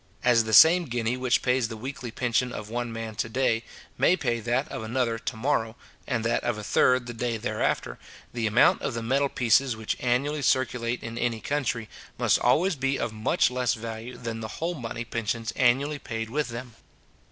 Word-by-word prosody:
As 115 Hz, -2 st, +4 dB
the 110 Hz, -, -3 dB
same 170 Hz, +5 st, +8 dB
guinea 120 Hz, -2 st, -1 dB
which 125 Hz, -1 st, +1 dB
pays 125 Hz, -2 st, +2 dB
the 110 Hz, -1 st, -7 dB
weekly 130 Hz, +1 st, -6 dB
pension 125 Hz, +1 st, 0 dB
of 105 Hz, -2 st, -7 dB
one 120 Hz, 0 st, -2 dB
man 115 Hz, -1 st, -5 dB
to 110 Hz, -, -2 dB
day, 115 Hz, -1 st, +1 dB, 0.4 s
may 180 Hz, -, +4 dB
pay 120 Hz, -7 st, -1 dB
that 120 Hz, +5 st, 0 dB
of -, -, -4 dB
another 115 Hz, 0 st, -1 dB
to -, -, -4 dB
morrow, 115 Hz, -3 st, 0 dB, 0.3 s
and 115 Hz, -, -1 dB
that 115 Hz, -, +1 dB
of 120 Hz, -3 st, -1 dB
a 105 Hz, -, -6 dB
third 125 Hz, +4 st, +3 dB
the 120 Hz, -, -6 dB
day 115 Hz, 0 st, -2 dB
thereafter, 110 Hz, -, -2 dB, 0.3 s
the 115 Hz, -2 st, -1 dB
amount 110 Hz, +3 st, +4 dB
of 120 Hz, -, -3 dB
the 115 Hz, -, -3 dB
metal 135 Hz, +4 st, +1 dB
pieces 125 Hz, +1 st, +2 dB
which 110 Hz, -1 st, -2 dB
annually 140 Hz, +5 st, 0 dB
circulate 125 Hz, -3 st, 0 dB
in 115 Hz, +1 st, -5 dB
any 120 Hz, -2 st, 0 dB
country, 120 Hz, -4 st, -2 dB, 0.3 s
must -, -, +3 dB
always 160 Hz, +9 st, +3 dB
be 135 Hz, 0 st, 0 dB
of 115 Hz, -2 st, -3 dB
much 110 Hz, +3 st, +1 dB
less 125 Hz, 0 st, 0 dB
value 115 Hz, +2 st, -7 dB
than 115 Hz, -2 st, -5 dB
the 110 Hz, -, -5 dB
whole 170 Hz, +2 st, -2 dB
money 120 Hz, -5 st, -5 dB
pensions 115 Hz, 0 st, -3 dB
annually 140 Hz, +4 st, +2 dB
paid 115 Hz, -3 st, -5 dB
with 150 Hz, 0 st, -1 dB
them. 120 Hz, 0 st, -7 dB
120 Hz, 200 wpm, -26 LUFS, 115-130 Hz, 0.4 s, same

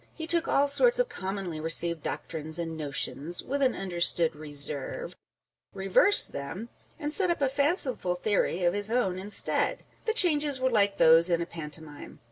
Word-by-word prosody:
He 320 Hz, -, -6 dB
took 335 Hz, 0 st, +2 dB
all 285 Hz, +1 st, +2 dB
sorts 480 Hz, -, +3 dB
of -, -, 0 dB
commonly 190 Hz, -4 st, -5 dB
received 165 Hz, +1 st, +1 dB
doctrines 160 Hz, +2 st, -5 dB
and 165 Hz, -1 st, -5 dB
notions 150 Hz, +2 st, -1 dB
(with 280 Hz, +2 st, -3 dB
an 260 Hz, -3 st, +2 dB
understood 175 Hz, -3 st, +1 dB
reserve) 145 Hz, -2 st, -3 dB
â€" -, -, -19 dB, 0.6 s
reversed 195 Hz, -, +4 dB
them, 180 Hz, +11 st, -7 dB, 0.3 s
and 300 Hz, -2 st, -4 dB
set 375 Hz, 0 st, 0 dB
up 345 Hz, -, -1 dB
a 280 Hz, -, +1 dB
fanciful 275 Hz, -, -1 dB
theory 185 Hz, -2 st, -1 dB
of 175 Hz, 0 st, +2 dB
his 205 Hz, +1 st, 0 dB
own 210 Hz, -6 st, 0 dB
instead. 200 Hz, +2 st, +1 dB, 0.2 s
The 445 Hz, -, 0 dB
changes 295 Hz, -, +2 dB
were 260 Hz, 0 st, 0 dB
like 200 Hz, -3 st, +1 dB
those 165 Hz, +2 st, +5 dB
in 170 Hz, -1 st, +1 dB
a 170 Hz, -, -2 dB
pantomime. 155 Hz, -2 st, -8 dB
190 Hz, 170 wpm, -27 LUFS, -, 0.6 s, those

